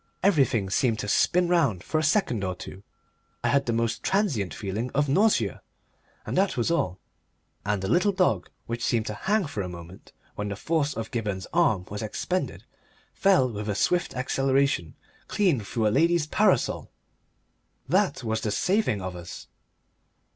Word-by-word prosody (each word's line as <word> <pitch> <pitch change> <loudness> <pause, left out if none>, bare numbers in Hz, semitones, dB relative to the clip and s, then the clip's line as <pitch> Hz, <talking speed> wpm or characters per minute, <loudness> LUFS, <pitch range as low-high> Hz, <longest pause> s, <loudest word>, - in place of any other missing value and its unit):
Everything 135 - +3
seemed 115 +1 +2
to 105 - -4
spin 180 - +3
round 155 - +2
for 155 - 0
a - - -1
second 140 - +1
or 90 -1 -2
two, 95 +2 -10 0.6
I - - +2
had 140 -1 +2
the - - +2
most 115 0 -1
transient 160 - 0
feeling 105 +4 -4
of 145 +1 +2
nausea, 200 +10 +2 0.6
and - - -3
that 190 -4 +1
was 120 +7 +1
all. 95 - 0 0.7
And 105 -2 0
the - - -1
little 180 - +3
dog 185 -2 +1 0.2
which 115 0 -4
had - - 0
seemed 115 -2 +1
to 105 - -3
hang 205 - 0
for 125 -8 -4
a 90 - -4
moment 85 +1 -11 0.2
when 105 0 -4
the 100 - -3
force 150 +3 -1
of 115 -1 -5
Gibberne's 105 -5 -3
arm 125 - +2
was 105 - -4
expended 180 - -3 0.5
fell 190 -10 +4
with 105 0 -5
a 100 - -1
swift 175 - +1
acceleration 135 - +1 0.3
clean 195 - +2
through 110 +2 -2
a - - +4
lady's 165 +3 +3
parasol! 190 - +1 1.0
That - - +1
was 110 -1 -1
the 110 - -1
saving 180 - +1
of 90 -1 -5
us. 90 0 -9
125 Hz, 170 wpm, -26 LUFS, 105-170 Hz, 1.0 s, fell